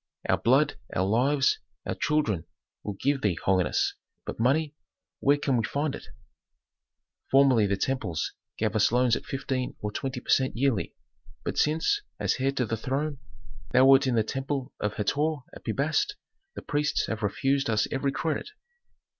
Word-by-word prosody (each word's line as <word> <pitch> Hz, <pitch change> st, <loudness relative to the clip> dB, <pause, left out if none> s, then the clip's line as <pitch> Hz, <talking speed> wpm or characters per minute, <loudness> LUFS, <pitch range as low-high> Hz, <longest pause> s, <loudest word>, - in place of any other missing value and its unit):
"Our -, -, +2 dB
blood, 140 Hz, +5 st, +3 dB, 0.2 s
our 90 Hz, -, +2 dB
lives, 130 Hz, +7 st, +2 dB, 0.3 s
our -, -, -1 dB
children 110 Hz, -, 0 dB, 0.4 s
we -, -, -15 dB
will 100 Hz, -, -5 dB
give 140 Hz, 0 st, +1 dB
thee, 100 Hz, -5 st, +1 dB
holiness. 95 Hz, -2 st, +2 dB, 0.3 s
But -, -, -6 dB
money 145 Hz, +6 st, +2 dB, 0.5 s
where 140 Hz, +1 st, +4 dB
can 135 Hz, -3 st, +1 dB
we 115 Hz, -, +1 dB
find 145 Hz, +5 st, -1 dB
it? -, -, -8 dB, 1.2 s
"Formerly 135 Hz, -6 st, +5 dB
the 100 Hz, 0 st, 0 dB
temples 105 Hz, -, -2 dB, 0.2 s
gave -, -, -1 dB
us -, -, +4 dB
loans 125 Hz, -1 st, +3 dB
at -, -, -6 dB
fifteen 130 Hz, -2 st, -3 dB
or 105 Hz, -, -3 dB
twenty 130 Hz, +3 st, -3 dB
per -, -, -17 dB
cent 130 Hz, -3 st, +2 dB
yearly, 130 Hz, -4 st, 0 dB, 0.5 s
but -, -, -2 dB
since, 160 Hz, -, +2 dB, 0.2 s
as -, -, +1 dB
heir 135 Hz, +1 st, +2 dB
to 130 Hz, -2 st, 0 dB
the 115 Hz, -, -2 dB
throne, 140 Hz, +5 st, -2 dB, 0.5 s
thou 130 Hz, -, +6 dB
wert 135 Hz, 0 st, +6 dB
in 125 Hz, -, +1 dB
the 110 Hz, -, +3 dB
temple 135 Hz, +2 st, -3 dB
of 105 Hz, 0 st, -2 dB
Hator 145 Hz, +9 st, +1 dB, 0.2 s
at -, -, -12 dB
Pi 115 Hz, -, -2 dB
Bast 150 Hz, -, 0 dB, 0.4 s
the -, -, -7 dB
priests 150 Hz, +1 st, 0 dB
have 110 Hz, -, -4 dB
refused 135 Hz, +6 st, 0 dB
us 110 Hz, -1 st, +2 dB
every 135 Hz, +1 st, 0 dB
credit. 160 Hz, -, -2 dB
135 Hz, 170 wpm, -27 LUFS, 110-140 Hz, 1.2 s, thou